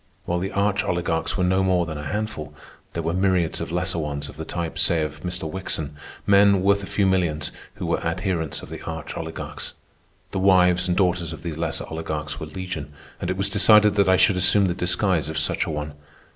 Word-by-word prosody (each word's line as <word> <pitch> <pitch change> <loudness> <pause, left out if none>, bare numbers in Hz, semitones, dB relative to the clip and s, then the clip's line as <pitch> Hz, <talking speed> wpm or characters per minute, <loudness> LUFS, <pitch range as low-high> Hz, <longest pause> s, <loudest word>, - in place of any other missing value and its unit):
While 85 0 0
the 95 +2 -3
arch 100 0 +1
oligarchs 85 -1 -1
were 90 - +1
no 95 +1 +2
more 90 -2 +2
than 80 -2 -5
a - - -6
handful, 75 -5 -4 0.4
there 85 - -3
were 85 +1 -1
myriads 95 -3 +1
of - - -4
lesser 90 0 0
ones 70 -2 -3
of 75 - -12
the 80 - -5
type, 85 -1 -4
say, 80 -1 +3
of 75 0 -5
Mr. 90 -1 -2
Wickson—men, 95 +4 +1
worth 100 +1 +3
a 100 - -7
few 100 - +1
millions, 90 -5 +1 0.2
who - - -5
were - - -1
adherents 90 -5 -2
of - - -10
the - - -7
arch 80 -2 -6
oligarchs. 80 0 -6 0.6
The 95 - -2
wives 90 -2 +4
and 90 - 0
daughters 90 -3 +1
of 80 - -10
these 85 -3 -4
lesser 80 0 -2
oligarchs 80 -2 -4
were 75 - -5
legion, 80 -3 -6 0.3
and 90 - -3
it 90 - -1
was 100 +1 +2
decided 105 +1 +6
that 100 -2 +3
I 95 - +5
should 95 - +4
assume 100 +2 +5
the 90 - +1
disguise 90 -2 +1
of 80 - -4
such 75 - +1
a - - -5
one. 75 -1 -4
90 Hz, 215 wpm, -24 LUFS, 80-95 Hz, 0.6 s, decided